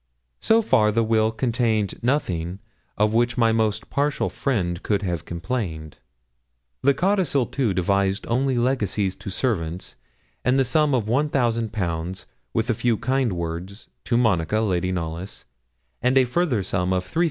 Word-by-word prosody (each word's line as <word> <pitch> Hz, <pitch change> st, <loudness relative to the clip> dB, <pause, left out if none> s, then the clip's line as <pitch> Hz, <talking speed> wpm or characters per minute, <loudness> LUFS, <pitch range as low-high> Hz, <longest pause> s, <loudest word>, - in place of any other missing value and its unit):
So 225 Hz, 0 st, +3 dB
far 110 Hz, -, +3 dB
the 115 Hz, +2 st, +2 dB
will 110 Hz, 0 st, +2 dB
contained 115 Hz, -3 st, 0 dB
nothing 90 Hz, -, -1 dB, 0.4 s
of 105 Hz, +1 st, +2 dB
which 120 Hz, +2 st, +2 dB
my 115 Hz, -2 st, +4 dB
most 110 Hz, -2 st, 0 dB
partial 145 Hz, +1 st, 0 dB
friend 90 Hz, -10 st, -1 dB
could 105 Hz, -1 st, 0 dB
have 85 Hz, -4 st, -2 dB
complained. 85 Hz, -, -4 dB, 0.8 s
The 140 Hz, +1 st, +3 dB
codicil, 180 Hz, -9 st, +1 dB
too, 125 Hz, -3 st, -1 dB
devised 100 Hz, +2 st, +1 dB
only 130 Hz, +2 st, +1 dB
legacies 105 Hz, -6 st, 0 dB
to 100 Hz, +1 st, -7 dB
servants, 90 Hz, -6 st, -2 dB, 0.5 s
and 130 Hz, +2 st, +3 dB
a 135 Hz, -, +3 dB
sum 145 Hz, +2 st, +2 dB
of 115 Hz, -5 st, 0 dB
1,000_l_., 110 Hz, -, -1 dB, 0.3 s
with -, -, 0 dB
a -, -, +2 dB
few 120 Hz, -3 st, +1 dB
kind 130 Hz, -3 st, 0 dB
words, 85 Hz, +4 st, -6 dB, 0.2 s
to 120 Hz, -, +1 dB
Monica, 105 Hz, -4 st, +2 dB
Lady 90 Hz, -4 st, 0 dB
Knollys, 85 Hz, +1 st, -5 dB, 0.6 s
and 125 Hz, +2 st, +3 dB
a 130 Hz, -, +6 dB
further 125 Hz, -, 0 dB
sum 90 Hz, 0 st, 0 dB
of 90 Hz, 0 st, 0 dB
3,000_l_. 160 Hz, -, -4 dB
110 Hz, 150 wpm, -23 LUFS, 95-125 Hz, 0.8 s, a